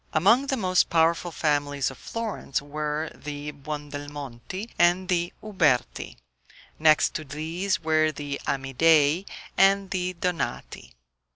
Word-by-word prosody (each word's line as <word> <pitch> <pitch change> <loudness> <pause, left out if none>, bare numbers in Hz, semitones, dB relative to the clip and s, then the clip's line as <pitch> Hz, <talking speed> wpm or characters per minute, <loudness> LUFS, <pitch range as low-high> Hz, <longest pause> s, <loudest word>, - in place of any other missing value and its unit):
Among 225 - +4
the 270 - 0
most 185 -4 +2
powerful 165 +1 +2
families 145 -3 0
of 130 - -12
Florence 225 - -3
were 150 +2 -3
the 145 0 -6
Buondelmonti 145 - -7
and 175 +2 +4
the 175 -1 +1
Uberti; 165 - 0 0.6
next 155 -1 +4
to 155 - -4
these 160 +6 -2
were 155 0 +3
the 145 -2 -5
Amidei 145 +5 +3 0.3
and 195 0 +4
the 185 -1 -1
Donati. 180 0 -4
155 Hz, 115 wpm, -26 LUFS, 145-180 Hz, 0.6 s, Among